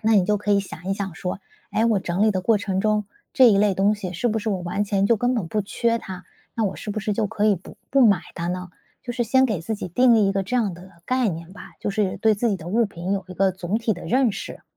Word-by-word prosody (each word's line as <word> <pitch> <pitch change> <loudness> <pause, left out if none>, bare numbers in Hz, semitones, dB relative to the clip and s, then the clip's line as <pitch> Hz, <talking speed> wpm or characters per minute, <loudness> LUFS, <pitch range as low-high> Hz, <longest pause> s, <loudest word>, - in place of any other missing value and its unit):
那 225 +1 +3
你 195 -3 +5
就 210 +3 +2
可 210 +1 -3
以 200 - +4
想 185 -2 -10
一 195 - 0
想 195 -3 -4
说： 180 +3 -4 0.3
“诶， 220 - +2
我 220 -4 +2
整 180 +2 -1
理 220 - +4
的 185 - -1
过 215 +3 +3
程 190 -1 -1
中， 210 0 +1 0.3
这 255 -2 +7
一 205 - +4
类 205 0 +3
东 200 +3 +3
西 190 -3 -6
是 185 +8 -2
不 220 0 0
是 220 - -2
我 195 - -1
完 175 +4 -1
全 200 -1 +1
就 230 - +4
根 245 +4 +1
本 220 -8 -1
不 210 +4 -1
缺 230 +3 0
它， 185 -4 -8 0.3
那 225 - +1
我 195 - -1
是 210 - -6
不 210 - -3
是 210 +1 -1
就 215 +1 0
可 210 +1 -1
以 210 - +5
不 175 - -13
不 270 -2 +5
买 200 -3 +4
它 170 0 -3
呢？” 180 0 -4 0.3
就 240 - -5
是 240 - -1
先 260 +4 +4
给 215 -9 -2
自 195 +7 -3
己 - - -5
定 240 +6 +4
义 210 -3 +4
一 - - +1
个 195 0 0
这 230 +7 -2
样 210 -7 0
的 180 +2 -13 0.2
概 255 -2 +1
念 165 0 -6
吧， - - -12
就 - - -2
是 200 -1 0
对 220 -1 +3
自 235 +4 0
己 200 - 0
的 165 - -11
物 230 +5 +2
品 180 0 -4
有 195 -1 -1
一 - - -7
个 190 +1 +2
总 185 +3 -2
体 225 -1 0
的 175 - -8
认 250 -2 +2
识。 - - -7
205 Hz, 320 characters per minute, -23 LUFS, 185-225 Hz, 0.3 s, 这